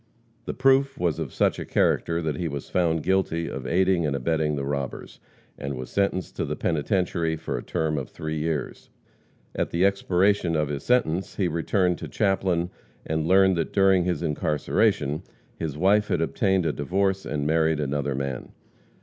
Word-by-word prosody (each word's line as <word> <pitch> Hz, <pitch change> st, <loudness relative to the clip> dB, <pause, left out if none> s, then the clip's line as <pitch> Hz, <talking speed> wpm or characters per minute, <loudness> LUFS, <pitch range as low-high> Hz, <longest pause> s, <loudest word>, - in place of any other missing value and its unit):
The -, -, -4 dB
proof 135 Hz, +1 st, +3 dB
was 85 Hz, -4 st, 0 dB
of -, -, -4 dB
such -, -, +1 dB
a -, -, -3 dB
character 85 Hz, 0 st, +1 dB
that 80 Hz, -2 st, -1 dB
he 85 Hz, -, -2 dB
was 70 Hz, -2 st, -6 dB
found 80 Hz, -3 st, +1 dB
guilty 90 Hz, -3 st, +1 dB
of 65 Hz, -2 st, -5 dB
aiding 90 Hz, +2 st, +2 dB
and 75 Hz, -3 st, 0 dB
abetting 75 Hz, +2 st, 0 dB
the 70 Hz, -1 st, -3 dB
robbers, 70 Hz, -1 st, -4 dB, 0.4 s
and 70 Hz, 0 st, -4 dB
was 65 Hz, 0 st, -7 dB
sentenced 100 Hz, -2 st, -1 dB
to -, -, -1 dB
the -, -, -3 dB
penitentiary 85 Hz, 0 st, 0 dB
for -, -, -4 dB
a -, -, -3 dB
term 80 Hz, -2 st, -1 dB
of 65 Hz, -, -6 dB
three 80 Hz, 0 st, -4 dB
years. 75 Hz, -3 st, -3 dB, 0.6 s
At -, -, -1 dB
the 85 Hz, +3 st, +2 dB
expiration 100 Hz, -2 st, +2 dB
of 75 Hz, -2 st, 0 dB
his 70 Hz, -1 st, -3 dB
sentence 95 Hz, -7 st, +1 dB
he 95 Hz, -, +1 dB
returned 90 Hz, +2 st, 0 dB
to -, -, -6 dB
Chaplin 95 Hz, -3 st, 0 dB, 0.3 s
and 80 Hz, 0 st, -1 dB
learned 95 Hz, 0 st, +5 dB
that 80 Hz, -, -2 dB
during 95 Hz, -2 st, +4 dB
his 90 Hz, 0 st, -1 dB
incarceration 75 Hz, +1 st, 0 dB, 0.4 s
his 75 Hz, -3 st, -3 dB
wife 100 Hz, +5 st, +3 dB
had -, -, 0 dB
obtained 95 Hz, +2 st, +1 dB
a -, -, +1 dB
divorce 95 Hz, +6 st, 0 dB
and 75 Hz, -1 st, -3 dB
married 80 Hz, 0 st, +2 dB
another 70 Hz, -1 st, -1 dB
man. 70 Hz, -1 st, -4 dB
85 Hz, 175 wpm, -25 LUFS, 75-95 Hz, 0.6 s, learned